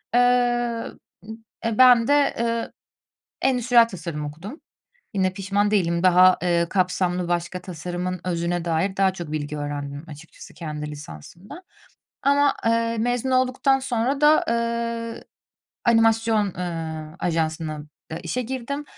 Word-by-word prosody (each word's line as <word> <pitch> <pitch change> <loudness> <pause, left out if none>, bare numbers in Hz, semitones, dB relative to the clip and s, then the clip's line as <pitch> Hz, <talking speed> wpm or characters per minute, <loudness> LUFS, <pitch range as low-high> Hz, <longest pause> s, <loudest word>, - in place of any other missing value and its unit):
Eee, 245 -1 +2 0.4
b - - -16 0.4
eee, 230 -2 -1
ben 245 -2 +7
de, 285 -1 +3
eee, 230 0 -1 0.7
endüstriyel 245 -2 +4
tasarım 165 -6 -6
okudum, 170 - -9 0.5
yine 190 -1 +1
pişman 200 +2 0
değilim, 170 -5 +1
daha, 185 0 +6
eee, 170 -1 +2
kapsamlı, 180 -2 0
başka 175 +1 -2
tasarımın 180 +1 -5
özüne 170 -1 -1
dair 170 +3 -1
daha 190 -1 +3
çok 170 -5 -7
bilgi 150 0 -3
öğrendim 145 0 -5
açıkçası 155 +2 -12
kendi 150 -3 -6
lisansımda. 150 - -11 0.6
Ama, 285 0 +3
eee, 230 0 +1
mezun 245 +2 0
olduktan 260 +2 +2
sonra 260 +2 -1
da, 300 +1 +5
ııı, 235 0 -2 0.6
animasyon, 225 -2 +3
ııı, 160 -3 -5
ajansına, 160 -2 -1 0.4
aaa, - - -3
işe 220 +9 -2
girdim. 265 +4 -4
195 Hz, 125 wpm, -23 LUFS, 170-235 Hz, 0.7 s, ben